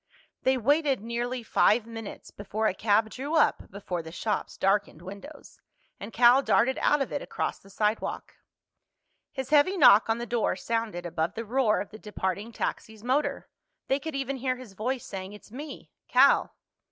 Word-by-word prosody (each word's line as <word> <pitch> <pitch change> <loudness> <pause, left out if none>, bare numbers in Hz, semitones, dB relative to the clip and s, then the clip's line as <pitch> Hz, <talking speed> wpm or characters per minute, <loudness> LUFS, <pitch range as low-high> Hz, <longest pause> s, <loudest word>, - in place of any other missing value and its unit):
They 260 0 +2
waited 285 +3 +2
nearly 240 +2 -3
five 220 0 +3
minutes 225 -2 -9
before 210 +2 -4
a 215 - +2
cab 220 +2 +2
drew 285 +5 -4
up 315 - +2
before 185 -3 -5
the 160 0 -10
shop's 210 +5 -3
darkened 195 -4 0
windows, 200 +11 -11 0.4
and 200 +3 -7
Cal 245 +3 +6
darted 260 -1 +2
out 295 -1 +3
of - - -9
it 285 - -2
across - - -3
the 195 - -18
sidewalk. 210 +3 -2 1.0
His 265 0 -6
heavy 305 +6 +4
knock 225 - +7
on 225 - +2
the 240 - -4
door 235 -5 0
sounded 215 -3 -3
above 165 0 -2
the 230 - -4
roar 235 -1 +2
of 200 - -6
the 215 - -11
departing 205 +1 -4
taxi's 220 -1 -5
motor. 265 +5 0 0.4
They 270 - +2
could 315 0 -6
even 275 0 -2
hear 255 0 -1
his 250 -5 -12
voice 245 +6 -3
saying, 190 0 -7
"It's 210 0 -14
me—Cal." 285 +4 +1
230 Hz, 170 wpm, -27 LUFS, 205-265 Hz, 1.0 s, knock